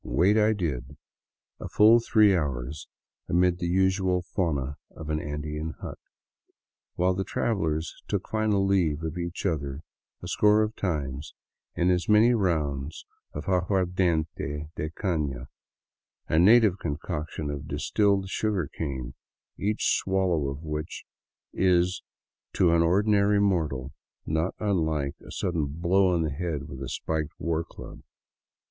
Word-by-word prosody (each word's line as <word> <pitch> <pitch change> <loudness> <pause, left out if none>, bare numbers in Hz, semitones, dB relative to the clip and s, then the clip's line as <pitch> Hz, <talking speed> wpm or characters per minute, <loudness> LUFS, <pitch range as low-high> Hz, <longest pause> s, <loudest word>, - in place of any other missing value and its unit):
Wait 90 - +3
I 110 0 +4
did, 75 - -4 0.6
a - - -6
full 110 +3 +6
three 105 -3 +4
hours, 70 -3 -3 0.4
amid 90 0 +2
the 85 - -1
usual 95 0 +2
fauna 70 -7 -2
of 80 -1 -7
an 75 - 0
Andean 75 +2 -4
hut, - - -7 1.0
while 90 +1 +2
the 95 +1 -2
travelers 80 -8 -1
took - - -2
final 110 -3 +1
leave 85 -6 +1
of 80 +2 -4
each 85 +2 -4
other 70 -5 -2 0.4
a - - -5
score 105 +1 +4
of 110 +1 -3
times 75 -5 -3 0.4
in 90 +1 +2
as 90 +2 0
many 110 +3 +6
rounds 80 - -1 0.3
of 75 - -5
aguardiente 90 -5 0
de 75 - -3
cam, 75 -8 -2 0.8
a 80 - +2
native 105 0 +6
concoction 75 0 -4
of 70 -1 -6
distilled 100 -2 +1
sugarcane, 80 - -3 0.5
each 105 +2 +1
swallow 95 -6 0
of 70 +3 -7
which 75 0 -5 0.5
is 90 0 +2 0.5
to 90 -3 +3
an 85 - +4
ordinary 100 +3 +3
mortal 75 -10 0 0.3
not 80 +3 -1
unlike 80 -9 0
a - - -13
sudden 85 -5 -1
blow 85 +6 +2
on 85 -2 +1
the 80 - -1
head 75 -2 -3
with 70 -3 -9
a 65 - -4
spiked 80 -2 -3
war 85 -1 -1
club. - - -11
85 Hz, 135 wpm, -27 LUFS, 75-95 Hz, 1.0 s, full